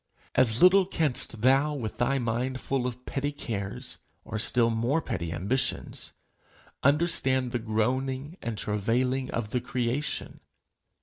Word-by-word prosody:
As 120 Hz, 0 st, +3 dB
little 185 Hz, +1 st, +7 dB
canst 130 Hz, -, 0 dB
thou, 135 Hz, +4 st, +4 dB
with 115 Hz, -6 st, -5 dB
thy 135 Hz, +3 st, +2 dB
mind 125 Hz, +2 st, -1 dB
full 130 Hz, -1 st, -1 dB
of 125 Hz, 0 st, -7 dB
petty 145 Hz, +1 st, -2 dB
cares, 100 Hz, -8 st, -5 dB, 0.3 s
or 110 Hz, -, -4 dB
still 115 Hz, +1 st, +4 dB
more 120 Hz, +7 st, +1 dB
petty 85 Hz, -, -4 dB
ambitions, 100 Hz, +11 st, -2 dB, 0.7 s
understand 135 Hz, -4 st, +2 dB
the 120 Hz, -, -1 dB
groaning 130 Hz, +7 st, -1 dB
and 115 Hz, -2 st, -4 dB
travailing 125 Hz, +6 st, 0 dB
of 110 Hz, -3 st, -3 dB
the 125 Hz, -, 0 dB
creation. 125 Hz, +3 st, -2 dB
125 Hz, 130 wpm, -28 LUFS, 115-135 Hz, 0.7 s, little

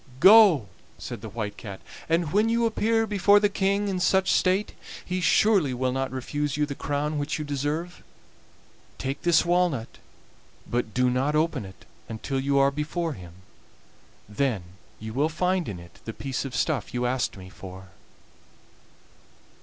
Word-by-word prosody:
"Go!" 190 Hz, -, +7 dB, 0.3 s
said 120 Hz, -4 st, -7 dB
the 110 Hz, -, -7 dB
White 105 Hz, -1 st, -5 dB
Cat, 100 Hz, -3 st, -8 dB, 0.3 s
"and 165 Hz, -2 st, +1 dB
when 210 Hz, +3 st, +3 dB
you 235 Hz, 0 st, +2 dB
appear 225 Hz, 0 st, +1 dB
before 205 Hz, -1 st, +4 dB
the 205 Hz, 0 st, +2 dB
King 200 Hz, +1 st, 0 dB
in 190 Hz, -2 st, -1 dB
such 190 Hz, +1 st, +2 dB
state 190 Hz, +3 st, +1 dB, 0.3 s
he 185 Hz, 0 st, -2 dB
surely 175 Hz, -, +3 dB
will 130 Hz, +1 st, 0 dB
not 135 Hz, +1 st, -2 dB
refuse 145 Hz, +2 st, -3 dB
you 150 Hz, -, +2 dB
the 145 Hz, -, -5 dB
crown 145 Hz, +2 st, -2 dB
which 145 Hz, -, -2 dB
you 150 Hz, -, -4 dB
deserve. 145 Hz, +5 st, -3 dB, 1.0 s
Take 135 Hz, +1 st, -4 dB
this 170 Hz, -2 st, +3 dB
walnut, 175 Hz, -9 st, 0 dB, 0.7 s
but 120 Hz, -3 st, -2 dB
do 125 Hz, 0 st, +3 dB
not 135 Hz, +4 st, 0 dB
open 155 Hz, -8 st, 0 dB
it 95 Hz, -1 st, -14 dB, 0.2 s
until 125 Hz, +5 st, -3 dB
you 140 Hz, +1 st, +1 dB
are 140 Hz, 0 st, +4 dB
before 155 Hz, +3 st, -3 dB
him, 90 Hz, -7 st, -11 dB, 0.9 s
then 105 Hz, -2 st, -1 dB, 0.4 s
you 110 Hz, 0 st, -7 dB
will 145 Hz, +5 st, +1 dB
find 180 Hz, 0 st, 0 dB
in 100 Hz, -, -5 dB
it 85 Hz, 0 st, -15 dB
the 115 Hz, -, -5 dB
piece 135 Hz, +2 st, -4 dB
of 130 Hz, -2 st, -6 dB
stuff 140 Hz, -6 st, -1 dB
you 125 Hz, 0 st, 0 dB
asked 125 Hz, -3 st, -1 dB
me 95 Hz, -1 st, -10 dB
for." 95 Hz, 0 st, -11 dB
145 Hz, 160 wpm, -26 LUFS, 125-180 Hz, 1.0 s, Go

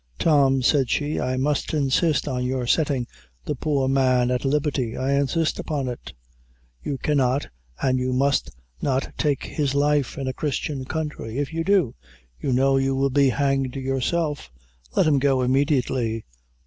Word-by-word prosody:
"Tom," 135 Hz, -, +3 dB
said 135 Hz, -1 st, +3 dB
she, 150 Hz, +1 st, 0 dB
"I 130 Hz, 0 st, -1 dB
must 145 Hz, +3 st, 0 dB
insist 150 Hz, +2 st, +1 dB
on 125 Hz, -2 st, -1 dB
your 125 Hz, 0 st, -1 dB
settin' 140 Hz, -2 st, +1 dB, 0.4 s
the -, -, -1 dB
poor 140 Hz, -1 st, 0 dB
man 130 Hz, -2 st, +2 dB
at 125 Hz, -, -1 dB
liberty; 140 Hz, -4 st, 0 dB
I 130 Hz, +1 st, -1 dB
insist 140 Hz, +4 st, 0 dB
upon 145 Hz, -4 st, -2 dB
it. 120 Hz, -1 st, -6 dB, 0.7 s
You 140 Hz, -, -3 dB
cannot, 135 Hz, -2 st, +1 dB, 0.4 s
an' 130 Hz, -1 st, +2 dB
you 130 Hz, 0 st, -1 dB
must 135 Hz, +2 st, +1 dB, 0.3 s
not 135 Hz, -1 st, -1 dB
take 145 Hz, -4 st, 0 dB
his 140 Hz, -3 st, -2 dB
life 145 Hz, 0 st, +1 dB
in 135 Hz, -2 st, -3 dB
a 130 Hz, -, -1 dB
Christian 140 Hz, -1 st, -3 dB
country; 150 Hz, -6 st, -4 dB
if 145 Hz, +2 st, -2 dB
you 165 Hz, 0 st, -1 dB
do, 185 Hz, -, +2 dB, 0.5 s
you 135 Hz, -, -2 dB
know 135 Hz, +2 st, +3 dB
you 135 Hz, 0 st, +1 dB
will 135 Hz, 0 st, +1 dB
be 140 Hz, 0 st, +4 dB
hanged 135 Hz, -1 st, 0 dB
yourself. 135 Hz, -, -1 dB, 0.5 s
Let -, -, +4 dB
him 150 Hz, -3 st, +3 dB
go 135 Hz, -1 st, +2 dB
immediately." 130 Hz, -4 st, 0 dB
135 Hz, 160 wpm, -23 LUFS, 130-145 Hz, 0.7 s, be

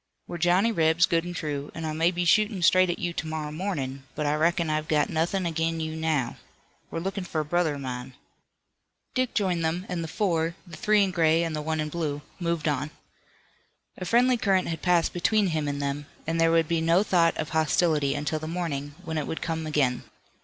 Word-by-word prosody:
We're 175 Hz, -, -6 dB
Johnny 180 Hz, +6 st, +3 dB
Rebs, 165 Hz, -3 st, +4 dB
good 165 Hz, 0 st, 0 dB
and 175 Hz, 0 st, -5 dB
true, 145 Hz, -3 st, -3 dB
and 165 Hz, -, -4 dB
I 155 Hz, -, -2 dB
may 165 Hz, +2 st, +3 dB
be 175 Hz, 0 st, -2 dB
shootin' 210 Hz, +1 st, +3 dB
straight 185 Hz, +3 st, +5 dB
at 175 Hz, -, -1 dB
you 175 Hz, -2 st, -2 dB
to 160 Hz, -, -4 dB
morrow 155 Hz, -1 st, -4 dB
mornin', 150 Hz, -6 st, -3 dB
but 150 Hz, -, -2 dB
I 145 Hz, -, +2 dB
reckon 170 Hz, +2 st, +2 dB
I've 155 Hz, 0 st, -1 dB
got 150 Hz, -1 st, +1 dB
nothin' 175 Hz, +4 st, 0 dB
ag'in 165 Hz, 0 st, -1 dB
you 160 Hz, 0 st, -3 dB
now. 155 Hz, -6 st, -1 dB, 0.5 s
We're -, -, -5 dB
lookin' 195 Hz, +2 st, -3 dB
for 165 Hz, -3 st, -3 dB
a -, -, -5 dB
brother 160 Hz, -1 st, +1 dB
o' -, -, -6 dB
mine." 130 Hz, -1 st, -6 dB, 1.0 s
Dick 255 Hz, -2 st, -1 dB
joined 180 Hz, -5 st, +1 dB
them, 170 Hz, +3 st, -1 dB
and 175 Hz, -2 st, -3 dB
the -, -, -4 dB
four, 170 Hz, -3 st, 0 dB
the 170 Hz, -3 st, -10 dB
three 210 Hz, +2 st, +3 dB
in 195 Hz, -, 0 dB
gray 165 Hz, -1 st, +3 dB
and 165 Hz, -2 st, -2 dB
the 150 Hz, -, -2 dB
one 160 Hz, +1 st, -2 dB
in 155 Hz, 0 st, -1 dB
blue, 150 Hz, -3 st, -3 dB, 0.2 s
moved 170 Hz, -2 st, -1 dB
on. 145 Hz, 0 st, 0 dB, 1.1 s
A -, -, -7 dB
friendly 245 Hz, +5 st, +4 dB
current 195 Hz, -6 st, +1 dB
had 165 Hz, -1 st, -4 dB
passed 175 Hz, -2 st, +2 dB
between 205 Hz, +2 st, +2 dB
him 155 Hz, -3 st, -1 dB
and 140 Hz, 0 st, -2 dB
them, 140 Hz, +1 st, -3 dB, 0.2 s
and 165 Hz, +1 st, 0 dB
there 165 Hz, -, +5 dB
would 165 Hz, -1 st, +3 dB
be 165 Hz, 0 st, 0 dB
no 165 Hz, +4 st, +4 dB
thought 170 Hz, -5 st, +3 dB
of 155 Hz, -, -3 dB
hostility 155 Hz, -2 st, +2 dB
until 150 Hz, +2 st, -2 dB
the 155 Hz, -, -6 dB
morning, 145 Hz, -4 st, -3 dB
when 160 Hz, -1 st, -2 dB
it 150 Hz, -, -4 dB
would 160 Hz, -, -4 dB
come 160 Hz, -1 st, -3 dB
again. 135 Hz, -5 st, +1 dB
165 Hz, 220 wpm, -26 LUFS, 155-175 Hz, 1.1 s, straight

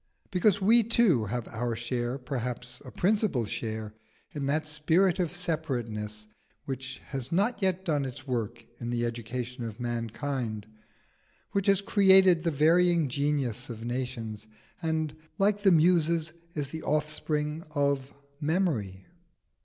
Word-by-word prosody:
Because 195 Hz, +1 st, +3 dB
we 225 Hz, +5 st, +6 dB
too 215 Hz, -, +3 dB
have 120 Hz, +2 st, -3 dB
our 120 Hz, 0 st, -2 dB
share 120 Hz, +2 st, -2 dB
perhaps 125 Hz, -2 st, -5 dB
a -, -, -9 dB
principal 200 Hz, -, +1 dB
share 110 Hz, 0 st, -4 dB, 0.4 s
in 140 Hz, -2 st, -3 dB
that 155 Hz, +2 st, 0 dB
spirit 165 Hz, +5 st, +2 dB
of 175 Hz, -4 st, 0 dB
separateness 120 Hz, -12 st, -3 dB, 0.4 s
which 130 Hz, -1 st, -5 dB
has 135 Hz, -2 st, -3 dB
not 205 Hz, +8 st, +1 dB
yet 190 Hz, -1 st, +1 dB
done 150 Hz, -5 st, +1 dB
its 130 Hz, 0 st, -7 dB
work 115 Hz, -3 st, -3 dB
in 120 Hz, -, -4 dB
the 120 Hz, 0 st, 0 dB
education 120 Hz, +2 st, -4 dB
of 115 Hz, 0 st, -6 dB
mankind, 120 Hz, -1 st, -3 dB, 0.9 s
which 200 Hz, 0 st, 0 dB
has 200 Hz, -1 st, +4 dB
created 190 Hz, -3 st, +6 dB
the 165 Hz, -, +1 dB
varying 165 Hz, +1 st, +4 dB
genius 135 Hz, -3 st, -1 dB
of 115 Hz, -1 st, -6 dB
nations, 115 Hz, -4 st, -4 dB, 0.3 s
and, 160 Hz, -2 st, -1 dB, 0.2 s
like 205 Hz, +1 st, +2 dB
the 195 Hz, -2 st, +5 dB
Muses, 165 Hz, -1 st, +3 dB, 0.2 s
is 145 Hz, -3 st, -2 dB
the 160 Hz, +2 st, -6 dB
offspring 150 Hz, +1 st, -1 dB
of 140 Hz, -2 st, 0 dB, 0.3 s
memory. 145 Hz, -, -1 dB
145 Hz, 135 wpm, -29 LUFS, 120-170 Hz, 0.9 s, we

